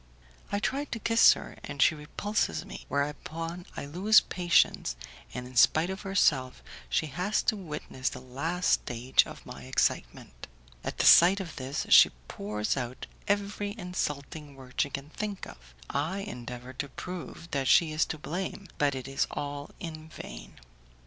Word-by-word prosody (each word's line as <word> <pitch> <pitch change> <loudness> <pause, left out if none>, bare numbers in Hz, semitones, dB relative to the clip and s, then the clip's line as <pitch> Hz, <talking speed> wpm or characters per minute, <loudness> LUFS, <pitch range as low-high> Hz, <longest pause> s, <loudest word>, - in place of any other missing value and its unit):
I 200 - +1
try 275 +7 -1
to 250 - -5
kiss 230 +1 +6
her, - - -9
and 140 -1 -7
she 140 - +6
repulses 150 - -2
me, - - -9
whereupon 165 +5 -3
I - - -4
lose 190 +9 +5
patience, 175 - +2 0.4
and 125 0 -5
in 125 0 -12
spite 160 +8 +5
of 190 - -6
herself 150 -10 +1 0.3
she - - +1
has 180 +8 -1
to - - +2
witness 150 -8 -4
the - - -8
last 145 +8 -1
stage 125 +2 +2
of - - -11
my 65 -1 -9
excitement. 60 -1 -1 0.4
At - - -4
the - - +1
sight 180 +4 +8
of 180 -4 -6
this, 130 +2 -3
she - - +9 0.2
pours 105 +1 -2
out 125 -2 -4 0.2
every 205 0 -1
insulting 150 -6 -4
word 130 -2 -4
she 140 - +1
can 140 +1 -6
think 205 0 -4
of; - - -14
I 165 +8 -2
endeavour 125 - -7
to 140 +2 -4
prove 175 0 -8
that 135 -2 0
she 160 +3 +5
is 155 +1 +2
to 160 - -5
blame, 180 +5 -5
but 145 -2 +2
it 130 0 -5
is 135 0 0
all 145 0 -5
in 155 -2 -7
vain. - - -10
150 Hz, 165 wpm, -29 LUFS, 130-180 Hz, 0.4 s, she